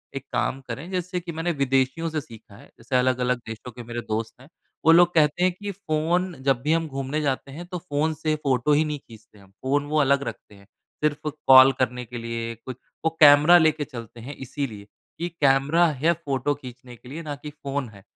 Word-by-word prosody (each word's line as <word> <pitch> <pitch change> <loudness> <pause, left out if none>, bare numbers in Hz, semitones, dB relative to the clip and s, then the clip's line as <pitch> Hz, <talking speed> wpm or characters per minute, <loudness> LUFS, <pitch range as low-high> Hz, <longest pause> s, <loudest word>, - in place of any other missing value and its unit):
एक 135 -1 -5
काम 135 - 0
करें। 140 +9 -6
जैसे 180 0 -2
कि 170 -1 -7
मैंने 165 +2 -2
विदेशियों 135 +2 0
से 155 -1 -2
सीखा 115 -4 -15
है, - - -15
जैसे 120 +3 -4
अलग-अलग 125 -1 +1
देशों 115 +2 -8
के 120 +1 -10
मेरे 120 +1 -5
दोस्त 110 +2 -3
हैं, 130 - -15 0.4
वो 165 - +8
लोग 175 +1 +6
कहते 155 +2 +3
हैं 185 - +4
कि, 205 +3 -6
"फ़ोन 175 0 -1
जब 135 -3 +2
भी 150 +3 +1
हम 165 -1 0
घूमने 135 +2 -3
जाते 135 -1 -2
हैं, 165 +6 -8
तो 180 - -5
फ़ोन 160 -2 -1
से 155 0 -1
फोटो 135 +2 +2
ही 150 +2 +3
नहीं 150 -2 -3
खींचते 110 -3 -17
हम।" 95 -1 -20
फ़ोन 140 +2 +1
वो 155 +1 +1
अलग 140 0 +2
रखते 105 - -8
हैं, 100 - -18 0.4
सिर्फ़ 150 0 0 0.2
कॉल 130 0 +9
करने 125 -1 -1
के 120 +2 -8
लिए 115 0 -4
कुछ 125 +2 -9 0.3
वो - - +5
कैमरा 150 +3 +8
लेके 160 -3 +2
चलते 120 -4 -10
हैं 140 +5 -8
इसीलिए, 130 -6 -6 0.3
कि 170 +1 -2
कैमरा 145 +5 +4 0.2
है 170 +1 +5
फोटो 140 0 0
खींचने 125 -2 -12
के 125 +2 -15
लिए, 155 +5 -6
ना 150 -2 -5
कि 150 +1 -9
फ़ोन 140 -3 -5
है। 100 -2 -15
140 Hz, 215 wpm, -24 LUFS, 125-155 Hz, 0.4 s, कॉल